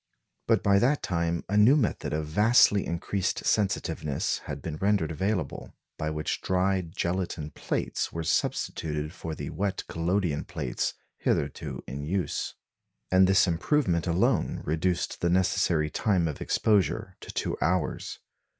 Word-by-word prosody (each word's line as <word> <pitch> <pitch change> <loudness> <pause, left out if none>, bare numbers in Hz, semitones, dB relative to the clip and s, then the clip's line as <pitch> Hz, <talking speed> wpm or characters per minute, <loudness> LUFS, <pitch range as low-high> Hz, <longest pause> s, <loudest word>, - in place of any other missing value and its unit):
But - - +3
by 100 0 +5
that 135 +6 +2
time 85 -1 -1
a 105 - -2
new 105 +7 +7
method 120 -8 -1
of 75 0 -1
vastly 105 +4 +4
increased 90 +3 -2
sensitiveness 95 -8 0
had 75 -1 -5
been 75 +2 -5
rendered 100 -3 +1
available, 90 -1 -2 0.2
by 75 - -1
which 75 0 -2
dry 95 +1 +1
gelatine 85 -2 -3
plates - - -2
were 85 - -4
substituted 75 -1 -1
for 80 -4 -6
the - - -5
wet 100 -1 -2
collodion 85 -1 0
plates - - -3 0.2
hitherto - - -1
in 70 +2 -6
use; 90 +4 -2 0.6
and 95 0 +6
this 95 +1 +5
improvement 90 - +1
alone 85 +2 +1
reduced 85 +3 -1
the 85 - +2
necessary 90 -4 +2
time 95 -4 +1
of 75 - -5
exposure 105 -4 +1
to - - -9
two - - -2
hours. 90 -2 -1
90 Hz, 140 wpm, -28 LUFS, 80-100 Hz, 0.6 s, new